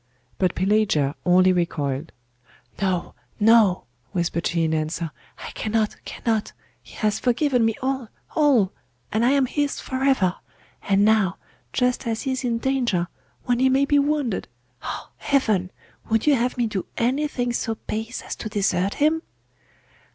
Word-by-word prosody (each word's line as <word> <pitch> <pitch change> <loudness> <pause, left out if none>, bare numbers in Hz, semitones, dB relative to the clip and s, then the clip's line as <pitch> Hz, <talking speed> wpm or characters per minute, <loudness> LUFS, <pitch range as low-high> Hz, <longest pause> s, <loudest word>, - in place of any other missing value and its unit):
But 185 - +1
Pelagia 190 -8 +2
only 185 +1 +5
recoiled. 155 -4 -1 0.7
'No, 185 -3 -1 0.3
no,' 215 -4 +5 0.3
whispered 170 -2 0
she 170 -1 0
in 160 0 +1
answer, 155 +1 -2 0.3
'I - - -8
cannot, 220 -1 -1
cannot 225 -2 -2 0.3
he - - -15
has 215 -1 0
forgiven 250 0 +2
me 225 -1 +2
all, 265 -2 -1 0.3
all! 265 -11 +4 0.4
and 220 +2 +1
I 245 - +4
am 275 -2 +3
his 290 +2 -1
for 260 0 -3
ever! 210 -10 +2 0.4
And 200 0 +3
now, 215 -4 +3 0.3
just 250 -1 0
as 225 -1 -2
he 265 - -1
is 260 0 -2
in 235 -2 0
danger, 235 -9 0 0.3
when 245 -1 +1
he 260 +1 +4
may 270 +2 +3
be 290 0 +3
wounded 285 -6 0 0.3
ah, - - -6
heaven! 215 -10 +1 0.4
would 225 0 +2
you 300 - +5
have 250 -1 0
me 240 - +2
do 210 -4 -3
anything 250 0 0
so 225 -1 -1
base 220 +3 -5
as - - -5
to 215 - -5
desert 195 -2 0
him? 310 +2 +2
225 Hz, 155 wpm, -23 LUFS, 185-260 Hz, 0.7 s, only